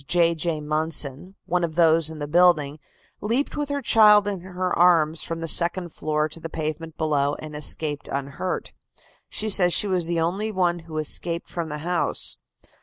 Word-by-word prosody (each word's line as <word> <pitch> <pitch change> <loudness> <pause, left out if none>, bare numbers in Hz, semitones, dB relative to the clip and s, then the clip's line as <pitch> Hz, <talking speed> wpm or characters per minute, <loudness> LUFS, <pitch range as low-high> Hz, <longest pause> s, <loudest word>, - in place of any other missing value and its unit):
J. 170 -1 +3
J. 160 -1 -2
Munson, 155 +2 -2
one 180 0 0
of 160 -2 -3
those 165 -2 +3
in 160 - -9
the 145 -1 -5
building, 155 -3 +3 0.4
leaped 235 +7 -1
with 295 -1 -3
her 285 -1 -3
child 210 -2 +6
in 200 -2 -2
her 185 0 -3
arms 165 -3 +3
from 165 0 -5
the 165 - -3
second 175 +2 +2
floor 155 0 -1
to 155 +2 -8
the 165 - -7
pavement 160 0 -5
below 145 -2 0
and 155 -1 -9
escaped 150 0 -2
unhurt. 140 +6 -4 0.6
She 220 - -1
says 180 -4 +5
she - - +4
was 185 -4 0
the 170 -1 -1
only 190 +7 -1
one 175 -3 0
who 160 -1 -9
escaped 165 +2 -3
from 170 -2 -4
the 150 - -4
house. 175 -1 -1
165 Hz, 180 wpm, -24 LUFS, 155-180 Hz, 0.6 s, child